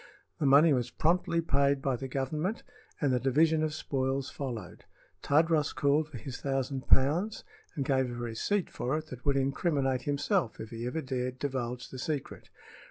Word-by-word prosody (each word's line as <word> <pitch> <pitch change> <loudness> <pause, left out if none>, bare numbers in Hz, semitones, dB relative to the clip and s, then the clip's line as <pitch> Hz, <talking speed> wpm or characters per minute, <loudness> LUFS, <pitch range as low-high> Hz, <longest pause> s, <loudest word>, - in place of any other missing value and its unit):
The 145 - +2
money 145 +3 +7
was 125 -2 0
promptly 170 +5 +1
paid 140 -2 +2
by 135 -1 0
the 135 +2 -5
Government 150 - -2 0.4
and 140 -4 +2
the 125 - +2
division 155 +5 +3
of 155 -1 0
spoils 135 -2 -1
followed. 115 -12 -6 0.4
Tadros 155 0 +2
called 145 +2 +2
for 140 - -8
his 125 +3 -7
thousand 135 -1 -2
pounds 170 +11 +3 0.3
and 140 -4 -1
gave 130 -2 +2
a 120 - -5
receipt 120 - -1
for 130 +5 -1
it 155 - -5
that 125 -1 -8
would 140 -1 +3
incriminate 135 -1 +1
himself 145 - 0
if 110 - -7
he 115 +1 -4
ever 160 +6 -2
dared 130 -1 -3
divulge 125 -3 -3
the 130 - -7
secret. 145 0 -4
135 Hz, 170 wpm, -30 LUFS, 130-155 Hz, 0.4 s, money